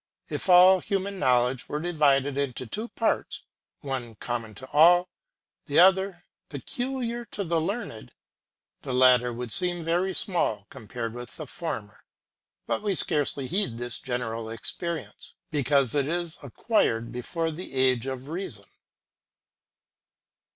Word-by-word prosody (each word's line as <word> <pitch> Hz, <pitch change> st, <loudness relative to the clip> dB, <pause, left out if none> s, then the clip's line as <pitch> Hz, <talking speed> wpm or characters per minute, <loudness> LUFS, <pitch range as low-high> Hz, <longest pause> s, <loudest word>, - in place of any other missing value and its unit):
If -, -, -4 dB
all 185 Hz, +1 st, +8 dB
human 195 Hz, 0 st, -2 dB
knowledge 125 Hz, -1 st, +2 dB
were 150 Hz, -, -2 dB
divided 145 Hz, -5 st, +2 dB
into 135 Hz, -3 st, -2 dB
two 215 Hz, -, -4 dB
parts, 230 Hz, -1 st, -1 dB, 0.4 s
one 130 Hz, -5 st, -5 dB
common 115 Hz, -1 st, -5 dB
to 130 Hz, +6 st, -10 dB
all, 175 Hz, +4 st, +6 dB, 0.6 s
the 145 Hz, -, 0 dB
other 190 Hz, 0 st, +4 dB, 0.2 s
peculiar 245 Hz, -, -4 dB
to 205 Hz, -2 st, -4 dB
the 165 Hz, -2 st, 0 dB
learned, 180 Hz, -, -4 dB, 0.7 s
the 130 Hz, -, -3 dB
latter 125 Hz, -1 st, +5 dB
would 120 Hz, -1 st, -4 dB
seem 180 Hz, -2 st, -1 dB
very 175 Hz, +3 st, 0 dB
small 110 Hz, -, 0 dB
compared 115 Hz, +1 st, -6 dB
with 120 Hz, 0 st, -9 dB
the 155 Hz, -, -6 dB
former. 125 Hz, -10 st, -6 dB, 0.6 s
But -, -, -1 dB
we 205 Hz, -2 st, 0 dB
scarcely 145 Hz, -5 st, +2 dB
heed 150 Hz, -, -1 dB
this 120 Hz, 0 st, -3 dB
general 115 Hz, -3 st, -4 dB
experience, 165 Hz, +9 st, -6 dB, 0.2 s
because 140 Hz, -4 st, +2 dB
it 140 Hz, -2 st, +1 dB
is 170 Hz, 0 st, -3 dB
acquired 120 Hz, -, 0 dB
before 160 Hz, +7 st, -3 dB
the 170 Hz, +4 st, -8 dB
age 130 Hz, -1 st, +2 dB
of 130 Hz, 0 st, -5 dB
reason. 155 Hz, -, -5 dB
145 Hz, 130 wpm, -26 LUFS, 125-180 Hz, 0.7 s, all